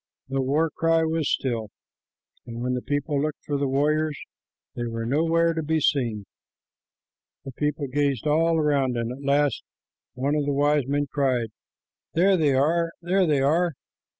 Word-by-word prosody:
The 135 Hz, 0 st, 0 dB
war 150 Hz, +5 st, +1 dB
cry 165 Hz, 0 st, +2 dB
was 160 Hz, -1 st, 0 dB
still, 115 Hz, -5 st, -1 dB, 0.8 s
and 115 Hz, 0 st, -7 dB
when 125 Hz, 0 st, -1 dB
the 125 Hz, -, -2 dB
people 145 Hz, +1 st, -1 dB
looked, 150 Hz, 0 st, -3 dB
for 145 Hz, -, -2 dB
the 140 Hz, 0 st, 0 dB
warriors, 150 Hz, +2 st, +1 dB, 0.6 s
they 120 Hz, -1 st, -3 dB
were 115 Hz, 0 st, -4 dB
nowhere 165 Hz, +5 st, +2 dB
to 160 Hz, -, -2 dB
be 160 Hz, +1 st, 0 dB
seen. 120 Hz, -8 st, 0 dB, 1.2 s
The 135 Hz, -, -6 dB
people 150 Hz, +2 st, -2 dB
gazed 140 Hz, -2 st, -1 dB
all 165 Hz, +2 st, +2 dB
around, 140 Hz, -5 st, +1 dB
and 115 Hz, 0 st, -2 dB
at 135 Hz, +3 st, -8 dB
last 140 Hz, +1 st, +1 dB, 0.5 s
one 135 Hz, +3 st, -1 dB
of 150 Hz, -1 st, 0 dB
the 145 Hz, -, +1 dB
wise 145 Hz, -1 st, +2 dB
men 145 Hz, +1 st, 0 dB
cried, 130 Hz, -5 st, +1 dB, 0.7 s
"There 190 Hz, +4 st, +4 dB
they 150 Hz, -6 st, +2 dB
are, 165 Hz, +5 st, +2 dB
there 185 Hz, +1 st, +2 dB
they 145 Hz, -3 st, +2 dB
are!" 165 Hz, +5 st, +2 dB
145 Hz, 165 wpm, -25 LUFS, 135-160 Hz, 1.2 s, There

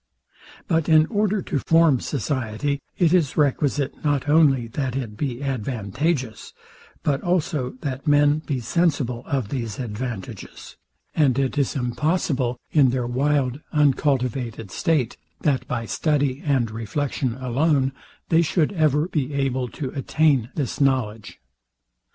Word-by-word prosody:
But 165 Hz, 0 st, +1 dB
in 155 Hz, -1 st, +6 dB
order 205 Hz, -2 st, +1 dB
to 140 Hz, -, -1 dB
form 165 Hz, -3 st, +4 dB
society, 135 Hz, +1 st, -2 dB, 0.2 s
it 175 Hz, -2 st, +3 dB
is 165 Hz, -7 st, +2 dB
requisite 145 Hz, -1 st, 0 dB
not 145 Hz, -2 st, 0 dB
only 145 Hz, -5 st, +4 dB
that 130 Hz, +1 st, -3 dB
it 120 Hz, -6 st, -4 dB
be 130 Hz, +2 st, -3 dB
advantageous, 130 Hz, -, -2 dB, 0.5 s
but 140 Hz, -2 st, +1 dB
also 160 Hz, -8 st, -1 dB
that 140 Hz, +1 st, -4 dB
men 145 Hz, +1 st, +4 dB
be 140 Hz, -5 st, -3 dB
sensible 130 Hz, -3 st, 0 dB
of 130 Hz, -7 st, -1 dB
these 115 Hz, -6 st, -4 dB
advantages; 115 Hz, -3 st, -6 dB, 0.4 s
and 140 Hz, -5 st, +3 dB
it 135 Hz, 0 st, 0 dB
is 140 Hz, -3 st, 0 dB
impossible, 130 Hz, 0 st, 0 dB
in 140 Hz, -4 st, +5 dB
their 125 Hz, -1 st, -1 dB
wild 135 Hz, +2 st, 0 dB
uncultivated 130 Hz, -, +1 dB
state, 140 Hz, -, 0 dB, 0.2 s
that 140 Hz, -4 st, 0 dB
by 115 Hz, -2 st, -2 dB
study 145 Hz, 0 st, 0 dB
and 130 Hz, -6 st, +1 dB
reflection 120 Hz, +2 st, -2 dB
alone, 135 Hz, +2 st, +1 dB, 0.4 s
they 165 Hz, 0 st, +5 dB
should 165 Hz, +2 st, +1 dB
ever 155 Hz, -2 st, +2 dB
be 150 Hz, -6 st, -2 dB
able 130 Hz, -2 st, 0 dB
to 130 Hz, +2 st, -5 dB
attain 140 Hz, -3 st, +1 dB
this 145 Hz, -2 st, -3 dB
knowledge. 120 Hz, -6 st, 0 dB
135 Hz, 130 wpm, -23 LUFS, 125-150 Hz, 0.5 s, in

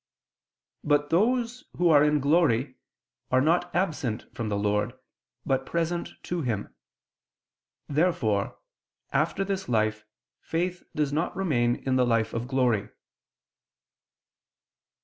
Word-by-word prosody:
But 145 Hz, 0 st, +2 dB
those 240 Hz, +6 st, +1 dB
who 175 Hz, -1 st, +3 dB
are 145 Hz, -1 st, +7 dB
in 150 Hz, -1 st, +3 dB
glory 140 Hz, -4 st, +2 dB, 0.6 s
are 130 Hz, -, +4 dB
not 170 Hz, +5 st, +2 dB
absent 150 Hz, -, -1 dB
from 115 Hz, -2 st, -3 dB
the 100 Hz, -, 0 dB
Lord, 105 Hz, +4 st, 0 dB, 0.5 s
but 135 Hz, -1 st, +1 dB
present 170 Hz, +3 st, -2 dB
to 175 Hz, -1 st, -2 dB
Him. 115 Hz, -7 st, -3 dB, 1.1 s
Therefore 140 Hz, -, +1 dB, 0.6 s
after 195 Hz, -, +1 dB
this 195 Hz, -4 st, -3 dB
life 110 Hz, -2 st, +1 dB, 0.4 s
faith 175 Hz, +2 st, -2 dB
does 150 Hz, -2 st, 0 dB
not 165 Hz, +4 st, -1 dB
remain 125 Hz, -11 st, +1 dB
in 130 Hz, -1 st, +2 dB
the 125 Hz, -, +4 dB
life 115 Hz, -2 st, +1 dB
of 115 Hz, +1 st, -3 dB
glory. 125 Hz, -6 st, +1 dB
145 Hz, 115 wpm, -27 LUFS, 115-175 Hz, 1.1 s, are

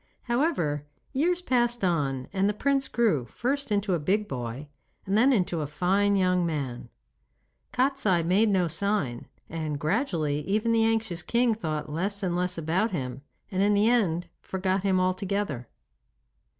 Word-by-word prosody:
However, 235 Hz, -, 0 dB, 0.3 s
years 350 Hz, +6 st, +1 dB
passed 240 Hz, -, +1 dB
on 140 Hz, -7 st, 0 dB
and 195 Hz, +1 st, +2 dB
the 210 Hz, -, -1 dB
prince 275 Hz, +3 st, +1 dB
grew 205 Hz, -, +1 dB
first 270 Hz, -, -2 dB
into 200 Hz, -1 st, +1 dB
a 175 Hz, -, +1 dB
big 205 Hz, +7 st, 0 dB
boy, 125 Hz, +2 st, -5 dB, 0.4 s
and 195 Hz, -, 0 dB
then 245 Hz, +6 st, +5 dB
into 180 Hz, -8 st, +1 dB
a 150 Hz, -, -2 dB
fine 195 Hz, +6 st, +2 dB
young 180 Hz, -2 st, +2 dB
man. 140 Hz, -7 st, -3 dB, 0.8 s
Kostiei 250 Hz, -10 st, +2 dB
made 200 Hz, +6 st, +3 dB
no 185 Hz, -3 st, +2 dB
sign, 165 Hz, -, -1 dB, 0.2 s
and 155 Hz, -3 st, -4 dB
gradually 155 Hz, -, 0 dB
even 215 Hz, +4 st, +1 dB
the 225 Hz, -1 st, +3 dB
anxious 220 Hz, -6 st, 0 dB
king 235 Hz, +5 st, +2 dB
thought 155 Hz, -8 st, -3 dB
less 200 Hz, +6 st, -2 dB
and 175 Hz, -2 st, 0 dB
less 180 Hz, 0 st, 0 dB
about 170 Hz, +7 st, +1 dB
him, 135 Hz, -, -4 dB, 0.3 s
and 190 Hz, 0 st, 0 dB
in 205 Hz, +1 st, +4 dB
the 205 Hz, +2 st, +4 dB
end 175 Hz, -8 st, +1 dB
forgot 190 Hz, 0 st, -1 dB
him 190 Hz, -1 st, +2 dB
altogether. 185 Hz, -, -1 dB
190 Hz, 155 wpm, -27 LUFS, 160-220 Hz, 0.8 s, then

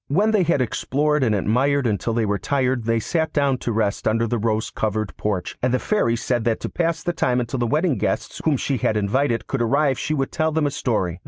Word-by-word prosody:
When 205 Hz, +10 st, +2 dB
they 215 Hz, -3 st, +3 dB
had 170 Hz, -6 st, +2 dB
explored 150 Hz, +5 st, 0 dB
and 110 Hz, -4 st, +2 dB
admired 130 Hz, +8 st, +1 dB
until 115 Hz, +1 st, 0 dB
they 115 Hz, -1 st, +1 dB
were 100 Hz, -1 st, -1 dB
tired 130 Hz, -4 st, 0 dB
they 115 Hz, 0 st, +2 dB
sat 160 Hz, +6 st, -1 dB
down 140 Hz, -3 st, +1 dB
to 120 Hz, -, -2 dB
rest 105 Hz, -2 st, -1 dB
under 115 Hz, +1 st, +2 dB
the 120 Hz, 0 st, -1 dB
rose 110 Hz, 0 st, -1 dB
covered 110 Hz, -1 st, -2 dB
porch, 100 Hz, -4 st, -3 dB
and 125 Hz, -, +1 dB
the 130 Hz, -, +2 dB
Fairy 130 Hz, -, +1 dB
said 120 Hz, 0 st, -1 dB
that 115 Hz, -2 st, +1 dB
to -, -, -3 dB
pass 165 Hz, -1 st, -1 dB
the 175 Hz, -, -1 dB
time 125 Hz, -6 st, +1 dB
until 120 Hz, +2 st, -3 dB
the 120 Hz, -, +1 dB
wedding 155 Hz, +2 st, +1 dB
guests -, -, -2 dB
whom 155 Hz, -4 st, +2 dB
she 135 Hz, +1 st, -1 dB
had 110 Hz, -1 st, 0 dB
invited 115 Hz, +4 st, 0 dB
could 135 Hz, -, -2 dB
arrive 135 Hz, +3 st, +2 dB
she 155 Hz, -, -1 dB
would 135 Hz, -2 st, -1 dB
tell 160 Hz, 0 st, 0 dB
them 155 Hz, -1 st, +1 dB
a 145 Hz, -, 0 dB
story. 95 Hz, -10 st, -1 dB
125 Hz, 240 wpm, -22 LUFS, 110-145 Hz, -, they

